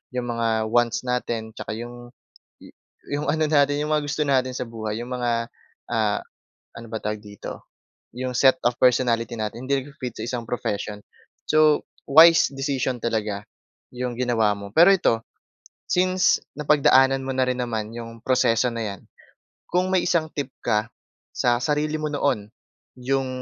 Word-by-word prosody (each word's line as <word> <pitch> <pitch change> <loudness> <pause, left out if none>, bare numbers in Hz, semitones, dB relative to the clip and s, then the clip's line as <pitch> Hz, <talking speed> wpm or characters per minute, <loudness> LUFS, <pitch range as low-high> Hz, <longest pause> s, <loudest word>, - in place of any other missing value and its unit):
'yong 125 -1 -2
mga 115 0 -1 0.2
wants 120 0 +2
natin 120 -3 -2
'tsaka 110 - -6
'yong 120 +1 -8 1.0
'yong 145 +1 -2
ano 155 +1 +1
natin, 145 -1 +3
'yong 150 - -3
mga 150 - +1
gusto 145 +1 -2
natin 130 -2 +1
sa 125 - -3
buhay. 110 -1 -4
'Yong 120 +1 -8
mga, 120 -1 -1 0.6
ah, 110 -3 +1 0.6
ano 115 0 -9
ba 110 - -2
tawag 105 0 -2
dito? 100 -1 -9 0.5
'Yong 130 0 -3
set 130 0 +5
of 120 0 +2
personality 120 -2 +2
natin 110 +4 -5
hindi 140 0 +1
nagpi-fit 130 -6 -7
sa - - -3
isang 120 -2 -3
profession. 105 -3 -3 0.5
So, 155 -1 +4 0.2
wise 160 +4 +7
decision 135 -2 -1
talaga 105 -3 -2 0.5
'yong 125 0 -3
ginawa 115 -4 +2
mo. 100 0 -9
Pero 175 +4 +8
ito, 180 -10 +2 0.8
since 185 0 +3 0.2
napagdaanan 135 -3 +4
mo 135 - -2
na 130 0 +2
rin 125 - -2
naman 110 -3 -3
'yong 115 -1 -9
proseso 125 -1 +3
na 115 -1 -3
'yan. 100 -2 -8 0.7
Kung 180 +1 +1
may 185 - +3
isang 165 -3 +1
tip 140 -2 -3 0.2
ka 105 +1 +1 0.5
sa 120 -1 +2
sarili 150 +1 0
mo 155 - -1
noon, 130 -8 0 0.5
yung 135 +1 0
125 Hz, 155 wpm, -24 LUFS, 115-140 Hz, 1.0 s, Pero